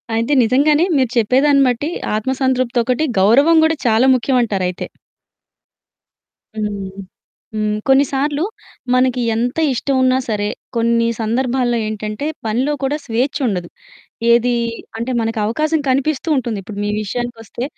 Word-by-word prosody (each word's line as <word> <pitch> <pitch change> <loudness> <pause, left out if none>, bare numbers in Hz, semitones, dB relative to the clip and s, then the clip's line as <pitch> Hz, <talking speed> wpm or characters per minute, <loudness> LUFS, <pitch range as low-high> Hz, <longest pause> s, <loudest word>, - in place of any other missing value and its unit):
అయితే 230 +6 0
నిజంగానే 295 +7 +3
మీరు 260 -3 +2
చెప్పేదాన్ని 275 +5 +4
బట్టి 250 +6 -1 0.3
ఆత్మ 220 +5 -1
సంతృప్తి 255 -2 0
ఒకటి, 255 +6 0
గౌరవం 275 +12 +5
గూడా 320 - +2
చాలా 225 +3 +4
ముఖ్యం 255 +1 0
అంటారు 195 -5 -1
అయితే. 180 - -5 1.7
హ్మ్. 205 -2 -3 0.7
హ్మ్. 215 0 0
కొన్నిసార్లు 280 +3 +2 0.5
మనకి 255 -1 +2
ఎంత 245 +5 -1 0.2
ఇష్టం 270 +3 -1
ఉన్నా 255 0 +3
సరే 205 -1 -1 0.3
కొన్ని 230 0 +2
సందర్భాల్లో 240 +1 0
ఏంటంటే 215 +4 -4 0.2
పనిలో 255 +7 0
కూడా 285 +3 0
స్వేఛ్చుండదు. 235 - -1 0.6
ఏది 240 +1 +4 0.4
అంటే 235 +3 -3
మనకవకాశం 230 +8 0
కనిపిస్తూ 275 +4 0
ఉంటుంది. 235 -5 -2
ఇప్పుడు 200 +1 -9
మీ 205 - -1
విషయానికొస్తే 240 +2 -5
245 Hz, 120 wpm, -18 LUFS, 220-270 Hz, 1.7 s, గౌరవం